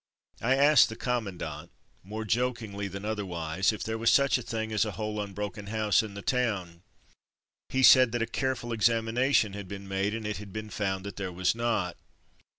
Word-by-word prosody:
I 130 +3 +3
asked 145 +2 +6
the 110 - -6
commandant, 115 -8 -4 0.3
more 110 +3 -6
jok 125 +3 +1
ingly 100 -3 -5
than 100 +2 -6
otherwise, 95 -3 -1
if 110 - -5
there 110 0 -3
was 115 - +3
such 140 -2 +4
a - - -6
thing 110 -1 -4
as 110 - +2
a 105 -2 -3
whole 105 -1 -3
unbroken 100 0 -5
house 105 -1 +2
in 105 -3 -8
the 100 - -7
town. 100 -10 -1 0.9
He 130 0 +1
said 130 0 +8
that 120 - 0
a - - 0
careful 130 -2 -2
examination 115 0 +2
had 100 -1 -7
been 100 +1 -8
made, 95 +2 -1
and 115 -1 -5
it 105 0 -2
had 105 -1 -9
been 110 +1 -6
found 95 -2 -2
that 100 - -7
there 100 -2 -3
was 90 0 +1
not. 115 -6 -1
110 Hz, 195 wpm, -28 LUFS, 100-115 Hz, 0.9 s, said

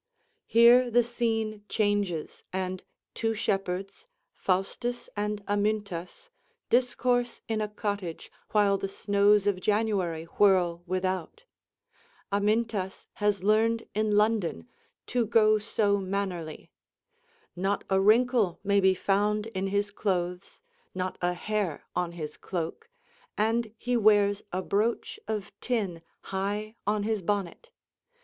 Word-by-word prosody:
Here 240 +2 +6
the 240 +1 +4
scene 225 -3 -2
changes, 205 -7 -1
and 185 0 -3 0.3
two 225 0 -1
shepherds, 195 - -2 0.3
Faustus 235 +6 -2
and 210 0 -2
Amyntas, 205 - -2 0.4
discourse 245 0 +1
in 220 -1 -1
a 210 - 0
cottage 205 -5 -4 0.2
while 200 -2 +3
the 195 - -2
snows 200 +1 +3
of 200 -3 +1
January 200 -6 0
whirl 175 -1 +3
without. 185 - -2 0.9
Amyntas 205 -1 0 0.2
has 205 -2 +1
learned 225 +2 +2
in 215 0 +1
London 210 - +1 0.4
"to 240 -3 0
go 215 -1 +4
so 205 -2 +1
manerly." 185 -5 -4 0.8
Not 195 +3 -1
a 190 0 +2
wrinkle 225 -2 +3
may 200 0 +3
be 190 -1 +4
found 205 +3 +1
in 190 +1 -1
his 200 +1 0
clothes, 180 -2 -2 0.3
not 185 0 -3
a 175 0 +1
hair 200 -3 -2
on 175 -1 -1
his 155 -3 -6
cloak, 180 - -5 0.5
and 225 +1 +1
he 245 +2 -1
wears 205 -2 +4
a 185 +1 -2
brooch 215 +5 -1
of 215 -2 -3
tin 200 -9 -1 0.2
high 205 +3 -3
on 210 0 +1
his 215 -1 -1
bonnet. 200 - -2
205 Hz, 120 wpm, -28 LUFS, 190-220 Hz, 0.9 s, Here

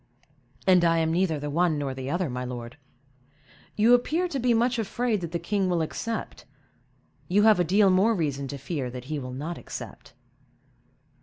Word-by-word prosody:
"And 185 -2 +5
I 165 -1 +3
am 160 0 +1
neither 170 -3 +1
the 145 0 -4
one 170 0 +2
nor 140 -2 -3
the 130 0 -6
other, 175 +3 0
my 125 -1 -4
lord. 120 -1 -7 1.0
You 225 +3 +5
appear 315 +9 +2
to 275 - -3
be 245 0 +2
much 235 +1 +2
afraid 225 -1 -1
that 170 -2 -5
the 170 - -1
king 190 +3 -1
will 170 -2 +1
accept; 225 +8 -5 0.8
you 200 +3 +3
have 215 -3 +6
a - - +4
deal 195 +3 +4
more 200 +5 +3
reason 140 -6 -2
to 140 - -6
fear 140 -1 -4
that 125 0 -8
he 150 - -2
will 125 -2 -6
not 155 +6 -5
accept." - - -9
175 Hz, 185 wpm, -26 LUFS, 145-210 Hz, 1.0 s, have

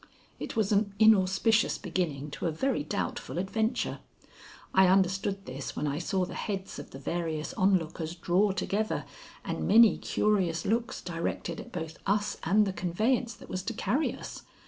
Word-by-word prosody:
It - - -5
was 220 -2 +1
an 200 -1 +2
inauspicious 215 +1 +4
beginning 160 -6 -3
to 155 - -3
a - - 0
very 200 - 0
doubtful 155 - -3
adventure. 220 +6 -1 0.7
I 190 0 +6
understood 195 +1 +2
this 130 +1 -6
when 150 - -2
I 145 +1 -1
saw 185 +1 0
the - - -8
heads 195 -3 -4
of - - -9
the - - -9
various 160 +1 -3
onlookers 175 -5 +1
draw 185 +4 +2
together 200 +3 -1 0.4
and - - -2
many 225 +1 +7
curious 190 -6 +1
looks 230 +3 -1
directed 170 -1 -3
at - - -9
both 160 -2 -6
us 205 +1 +1
and 210 +5 +4
the 195 - -2
conveyance 220 +7 0
that - - -13
was 185 - -3
to 225 +4 -4
carry 255 +12 +1
us. - - -8
190 Hz, 165 wpm, -29 LUFS, 170-210 Hz, 0.7 s, many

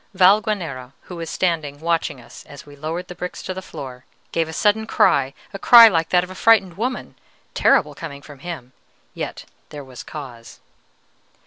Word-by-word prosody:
Valguanera, 185 - +2
who 180 - -9
was 165 -1 -5
standing 160 -6 -1
watching 165 -4 -1
us 120 - -13
as 145 - -12
we 145 -1 -14
lowered 160 +5 -5
the - - -8
bricks 180 0 -7
to 185 - -4
the 190 - -6
floor, 130 -7 -9 0.3
gave 165 -1 -1
a - - -5
sudden 210 +6 +1
cry, 135 -10 +3 0.2
a 195 - -6
cry 235 +1 +9
like 165 -6 +1
that 180 -1 +3
of 180 - -8
a - - -7
frightened 195 -3 +3
woman, 250 +5 -4 0.4
terrible, - - +3
coming 140 -4 -9
from 145 -2 -13
him. 140 -7 -8 0.4
Yet - - -6 0.2
there 145 -1 -8
was 130 -2 -10
cause. 125 -6 -10
165 Hz, 180 wpm, -21 LUFS, 140-185 Hz, 0.4 s, cry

